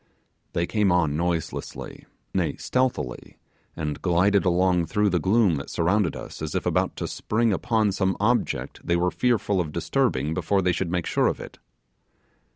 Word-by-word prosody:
They 85 - +1
came 105 0 +1
on 80 -5 +2
noiselessly, 85 0 -3 0.3
nay 85 -6 0
stealthily, 125 - -2 0.4
and 75 -2 -4
glided 95 +3 +3
along 90 -1 +2
through 105 +5 +1
the 90 - +2
gloom 95 -1 +3
that 70 - -6
surrounded 90 +1 +1
us - - -8
as 80 -1 -4
if - - -1
about - - +1
to - - -4
spring 110 0 0
upon 110 0 +1
some 95 -1 0
object 120 +4 0
they 85 - +1
were 90 +1 +1
fearful 105 -6 +1
of 80 -3 -4
disturbing 75 0 0
before 100 +3 +1
they 90 - +3
should 90 0 -2
make 90 -1 -1
sure - - +2
of - - -1
it. - - -10
90 Hz, 165 wpm, -25 LUFS, 85-105 Hz, 0.4 s, glided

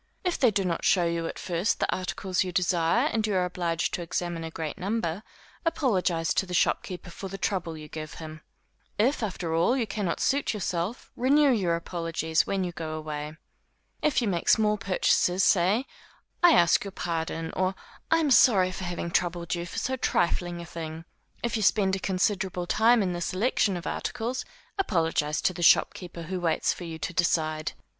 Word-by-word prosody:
If 360 -2 -1
they 255 - +5
do 195 -2 0
not 170 -2 -2
show 180 -3 +4
you 170 0 -1
at - - -6
first 175 +4 -1
the - - 0
articles 185 0 -1
you 185 - -4
desire, 180 - +2
and 220 -1 +1
you 205 - 0
are 180 -1 +2
obliged 170 -2 -1
to - - -2
examine 170 0 -3
a 165 - -4
great 160 -2 -5
number, 195 -2 -2 0.4
apologize 195 - +1
to 190 - 0
the 180 - -3
shopkeeper 180 +1 0
for 195 - -7
the 195 +1 -6
trouble 180 -4 -2
you 155 0 -9
give 155 0 -7
him. 155 -1 -9 0.6
If, 245 +7 +2
after 180 -6 -3
all 170 +11 +3
you 240 - 0
cannot 195 -4 -2
suit 280 -4 +1
yourself, 185 +2 -3
renew 280 +3 +4
your 185 -8 +1
apologies, 165 -1 -1
when 195 -1 0
you 180 - -2
go 160 -2 -5
away. 155 0 -5 0.6
If 290 -4 +2
you - - 0
make 175 -4 -1
small 210 -1 +4
purchases, 185 -2 +2
say, 195 +8 +3 0.6
I 350 -2 +7
ask 170 0 +4
your 200 - -5
pardon, 165 -3 -3
or 185 +1 0 0.3
I 325 - +4
am 310 -4 +1
sorry 190 -8 +6
for 185 - -5
having 175 -1 -4
troubled 175 -1 0
you 175 0 -3
for - - -8
so 260 +1 -1
trifling 175 -5 0
a - - -8
thing. 160 -1 -7 0.4
If 235 -1 -1
you 220 - -1
spend 195 -1 +3
a - - -4
considerable 190 -1 -1
time 225 +4 +4
in 180 -2 -1
the 175 - -4
selection 195 +1 +1
of 175 - -8
articles, 245 +2 -3 0.3
apologize 165 - +1
to 185 - +2
the 175 - -7
shopkeeper 170 0 +3
who 185 +3 -4
waits 165 -2 +1
for 175 - -8
you 165 -1 -6
to 160 +3 -4
decide. 155 -3 0
180 Hz, 190 wpm, -27 LUFS, 165-205 Hz, 0.6 s, I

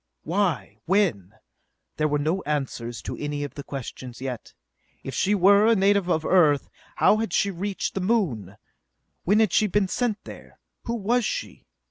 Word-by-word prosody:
Why? 170 - -1
When? 140 - +1 0.6
There 155 - +2
were 150 0 +1
no 160 +6 0
answers 130 - -3
to - - -5
any 145 0 -3
of 145 - -6
the 145 - -7
questions 130 -2 -7
yet. 130 -3 -6 0.5
If 135 - -6
she 205 +2 +1
were 200 +3 +5
a 230 - +5
native 200 -2 +2
of 160 -2 +1
Earth, 155 -6 +3 0.2
how 215 - +4
had 220 -4 -2
she 200 - +2
reached 195 +2 -3
the 195 - -2
Moon? 145 - -1 0.7
When 205 +4 +4
had 215 -5 +2
she 215 - +4
been 205 0 +1
sent 225 +1 -1
there? - - -12 0.3
Who 235 - -2
was 235 +3 +1
she? - - -5
180 Hz, 170 wpm, -25 LUFS, 140-205 Hz, 0.7 s, were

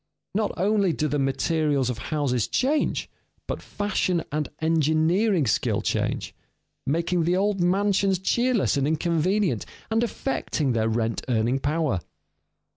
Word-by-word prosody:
Not 215 +1 0
only 195 -1 +2
do 155 - 0
the 145 0 -1
materials 140 -1 +1
of 120 - -6
houses 135 -7 0
change, 285 +4 0 0.4
but - - -4
fashion 190 -4 -1
and 150 0 -2
engineering 160 +4 +2
skill 105 - +1
change, - - -1 0.5
making 170 +4 +1
the 175 +3 +2
old 200 -1 +1
mansions 195 +1 +2
cheerless 235 - +1
and 140 0 +1
inconvenient, 165 - +1 0.3
and 225 +1 +2
affecting 220 - -1
their 115 -1 +1
rent 115 0 -1
earning 120 +3 +1
power. 150 - 0
165 Hz, 125 wpm, -25 LUFS, 140-195 Hz, 0.5 s, only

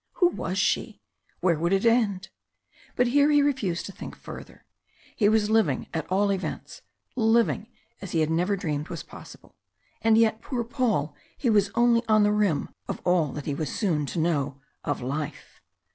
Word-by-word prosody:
Who 355 - +3
was 190 - -4
she? 215 +2 0 0.4
Where 170 -4 +2
would 170 +2 0
it 195 +3 +2
end? 215 -5 +2 0.7
But 250 - +3
here 285 +4 +4
he 290 -1 +5
refused 195 -12 -1
to - - -7
think - - -9
further. - - -11 0.5
He 205 -2 +3
was 215 -1 +2
living 200 - +2
at 160 +1 -4
all 200 +2 +2
events 190 - -5 0.3
living 225 -2 +2 0.3
as 195 - -7
he 165 - +1
had 155 0 +1
never 180 +5 +1
dreamed 150 -4 -3
was - - -6
possible. - - -13 0.5
And 225 -1 +4
yet, 225 -1 +3
poor 245 -3 -3
Paul, 225 - -1 0.2
he 245 -4 +1
was 205 -2 +3
only 235 -1 +4
on 215 -1 +4
the 205 - +3
rim 205 -8 +1 0.2
of - - -4
all 175 -3 +3
that 145 - -6
he 145 - -2
was 150 +2 -3
soon 160 -9 0
to - - -5
know 145 -4 0 0.2
of 145 -3 -2
life. 145 +3 -5
200 Hz, 180 wpm, -26 LUFS, 160-225 Hz, 0.7 s, he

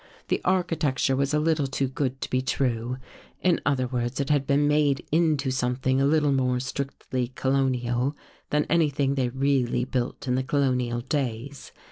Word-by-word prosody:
The - - +1
architecture 165 -8 +1
was 140 +1 0
a 150 - +2
little 155 -2 +1
too 135 0 -1
good 130 0 -3
to - - -3
be 130 - +2
true. 125 -2 -1 0.5
In 180 -2 +3
other 135 -3 +2
words, 125 +1 -2
it 140 +1 0
had 145 -2 +2
been 145 0 +3
made 150 -2 +2
into 155 -4 +2
something 130 +1 0
a 140 - +3
little 150 -1 +3
more 130 -2 +1
strictly 130 -1 -3
colonial 130 0 0 0.3
than 150 0 +1
anything 145 -4 +2
they 130 -3 0
really 130 -2 +1
built 130 +2 -3
in 125 - +1
the 130 - +1
colonial 125 -3 0
days. 130 0 -3
135 Hz, 165 wpm, -26 LUFS, 125-145 Hz, 0.5 s, In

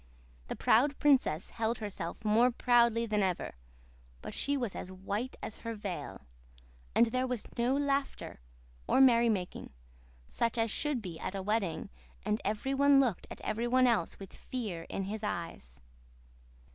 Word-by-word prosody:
The - - -4
proud 275 +5 +3
princess 260 - +2
held 225 +1 -1
herself 205 -2 -5
more 225 +4 +5
proudly 235 -1 +3
than 215 -2 0
ever, 185 -3 -1 0.7
but - - -6
she 285 0 0
was 240 -7 -3
as 185 - -6
white 200 +7 -4
as 220 - -5
her 230 -1 -5
veil. 200 -4 -5 0.7
And 235 - +6
there 255 +1 0
was 250 -4 -2
no 245 +3 +2
laughter 280 -1 -1 0.5
or - - +3
merry 235 -3 +6
making, 185 - -3 0.5
such 230 - -1
as 225 -1 +1
should 285 -3 -1
be 170 -4 -7
at 200 - -4
a 195 - -3
wedding, 205 -4 -1 0.3
and 210 - 0
every 215 +6 -1
one 280 0 +5
looked 245 -9 +1
at - - -9
every 230 +3 -1
one 255 +1 +4
else 230 -9 +1
with 195 -2 -10
fear 205 -10 -5
in 195 - -3
his 210 +3 -4
eyes. 165 - -5
225 Hz, 160 wpm, -32 LUFS, 195-250 Hz, 0.7 s, And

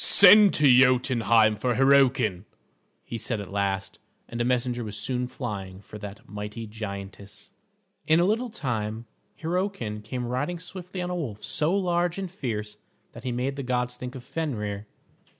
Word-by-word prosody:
"Send 200 +1 +9
to 150 - +3
Jotunheim 120 -4 +4
for 120 +2 0
Hyrroken," 130 -7 +3 0.6
he 115 - -6
said 110 0 -3
at 100 -2 -8
last; 100 -1 -2 0.3
and 120 0 -4
a - - +2
messenger 125 0 0
was 105 -1 -6
soon 125 +1 -2
flying 100 -7 -6
for 105 +1 -11
that 105 0 -9
mighty 105 +2 -6
giantess. 100 -1 -8 0.6
In 160 +1 +5
a 175 - +4
little 230 +5 0
time, 115 - -3 0.3
Hyrroken 165 - -2
came 125 +3 -4
riding 130 +8 -2
swiftly 180 +1 -7
on 180 - -3
a - - -2
wolf 120 -12 -5
so 155 +5 +1
large 175 -2 0
and 190 -3 -4
fierce 110 - -4 0.3
that 120 - -12
he 125 - -1
made 130 +3 -2
the - - -3
gods 125 -1 -1
think 125 +1 -7
of 130 - -8
Fenrer. 110 -8 -4
125 Hz, 165 wpm, -26 LUFS, 105-155 Hz, 0.6 s, Send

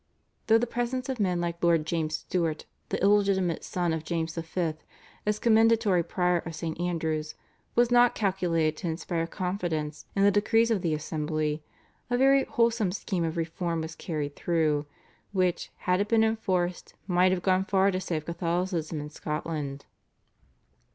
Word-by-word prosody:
Though 225 - +6
the 235 - +1
presence 245 +2 -2
of 260 -3 -2
men 180 -4 +1
like 170 0 -3
Lord 165 -2 +3
James 160 -1 -1
Stuart, 160 -1 -2 0.2
the - - -1
illegitimate 195 -4 +3
son 175 -2 -1
of 160 -1 -3
James 165 -1 -2
V., 165 0 -2 0.5
as 210 0 +2
commendatory 225 -4 +4
prior 180 +1 +1
of 165 -1 -7
St. 160 0 -4
Andrew's 160 -3 -2 0.4
was 240 0 +4
not 245 0 +5
calculated 175 -6 +1
to 180 - -4
inspire 165 0 -2
confidence 170 -5 -3
in 195 - +3
the 205 - +6
decrees 225 +3 +3
of 210 -5 +1
the 165 -3 0
assembly, 155 0 -2 0.5
a 245 - +1
very 270 +1 +5
wholesome 230 -6 +1
scheme 185 -2 -2
of 165 0 -2
reform 165 0 -2
was 160 0 -6
carried 150 -4 -4
through, 155 -4 +1 0.5
which, 185 -2 0 0.2
had 180 +1 +3
it 205 - 0
been 225 0 +4
enforced, 185 -6 -1
might 185 0 +3
have 180 -2 -1
gone 185 0 +3
far 195 0 +3
to 185 0 -2
save 160 -5 -3
Catholicism 170 -1 -2
in 150 0 -7
Scotland. 150 -2 -4
175 Hz, 160 wpm, -28 LUFS, 160-200 Hz, 0.5 s, Though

